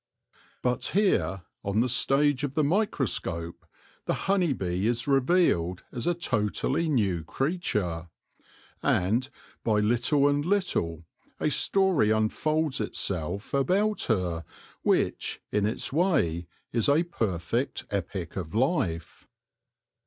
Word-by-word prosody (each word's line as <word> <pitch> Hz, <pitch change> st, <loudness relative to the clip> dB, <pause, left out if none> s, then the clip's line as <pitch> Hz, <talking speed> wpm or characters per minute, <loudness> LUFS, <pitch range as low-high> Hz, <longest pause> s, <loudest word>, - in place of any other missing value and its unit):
But 125 Hz, -1 st, 0 dB
here, 95 Hz, -, +2 dB, 0.2 s
on 100 Hz, +3 st, +1 dB
the 125 Hz, -, +2 dB
stage 135 Hz, +3 st, +2 dB
of 140 Hz, -2 st, -2 dB
the 155 Hz, -, +3 dB
microscope, 135 Hz, -, -1 dB, 0.4 s
the -, -, 0 dB
honey 190 Hz, -5 st, +2 dB
bee 95 Hz, -4 st, -1 dB
is 120 Hz, 0 st, 0 dB
revealed 135 Hz, -, +2 dB
as 120 Hz, +2 st, -4 dB
a 175 Hz, -, +2 dB
totally 130 Hz, +2 st, 0 dB
new 100 Hz, -, +1 dB
creature; 105 Hz, -, -2 dB, 0.7 s
and, 115 Hz, +9 st, +1 dB, 0.3 s
by 110 Hz, -2 st, +2 dB
little 120 Hz, +6 st, +3 dB
and 145 Hz, 0 st, +1 dB
little, 145 Hz, -, -1 dB, 0.3 s
a 150 Hz, -, +1 dB
story 190 Hz, -, +2 dB
unfolds 135 Hz, +7 st, +1 dB
itself 95 Hz, -2 st, -2 dB
about 195 Hz, +10 st, +1 dB
her 90 Hz, -7 st, 0 dB, 0.4 s
which, -, -, 0 dB
in 105 Hz, -1 st, +2 dB
its 110 Hz, -, -3 dB
way, 90 Hz, -, +1 dB, 0.3 s
is 115 Hz, +3 st, +2 dB
a 150 Hz, +4 st, +4 dB
perfect 115 Hz, -, -2 dB
epic 95 Hz, -3 st, -3 dB
of 90 Hz, 0 st, -5 dB
life. 115 Hz, -, -1 dB
120 Hz, 115 wpm, -27 LUFS, 90-150 Hz, 0.7 s, a